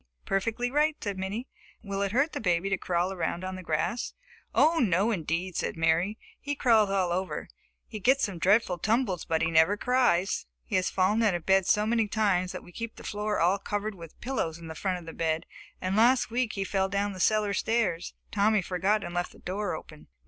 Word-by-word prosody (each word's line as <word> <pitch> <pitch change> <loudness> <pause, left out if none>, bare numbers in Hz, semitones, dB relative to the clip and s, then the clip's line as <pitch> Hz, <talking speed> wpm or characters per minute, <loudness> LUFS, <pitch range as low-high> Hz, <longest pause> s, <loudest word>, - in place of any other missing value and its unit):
"Perfectly 230 +5 -1
right," 300 +2 +2
said 200 -2 -4
Minnie. 205 +7 -4 0.4
"Will 200 -1 -3
it 200 -1 0
hurt 275 +7 +1
the - - -3
baby 180 -1 +1
to 195 - +2
crawl 180 +1 0
around 170 0 -2
on 185 0 -4
the 185 - -7
grass?" 165 +8 -2 0.4
"Oh, 325 +2 +4
no, 200 - +2
indeed," 170 -1 -2
said - - -2
Mary. 165 +6 +2 0.2
"He 285 0 -3
crawls 225 -6 +4
all 190 -3 +1
over. 185 +2 -2 0.4
He 215 - -7
gets 265 +7 +3
some 195 -5 -2
dreadful 185 0 +3
tumbles 215 -4 0
but 165 -1 0
he 165 - +1
never 160 +5 +4
cries. 205 - +1 0.2
He - - -3
has 185 0 +2
fallen 195 +4 +2
out 210 -5 +3
of 175 - -5
bed 190 -1 +3
so 210 0 +3
many 225 -1 +2
times 200 -4 +1
that - - -7
we - - -14
keep 230 +5 -6
the - - -12
floor 210 0 -2
all 180 +4 +3
covered 205 +2 -3
with 165 -4 -12
pillows 235 -11 -2
in 165 -1 -8
front 185 +3 -2
of 175 - -10
the 165 - -8
bed, 160 -1 -1 0.3
and 185 +1 -1
last 240 +3 +4
week 245 -1 0
he 195 - -2
fell 195 0 0
down 200 +1 -1
the 185 - -9
cellar 210 +1 +2
stairs. 205 -6 0 0.2
Tommy 210 0 +3
forgot 190 +4 +1
and 175 - -6
left 175 0 -2
the - - -16
door 190 -1 -3
open." 155 -1 -11
195 Hz, 215 wpm, -28 LUFS, 175-220 Hz, 0.4 s, Oh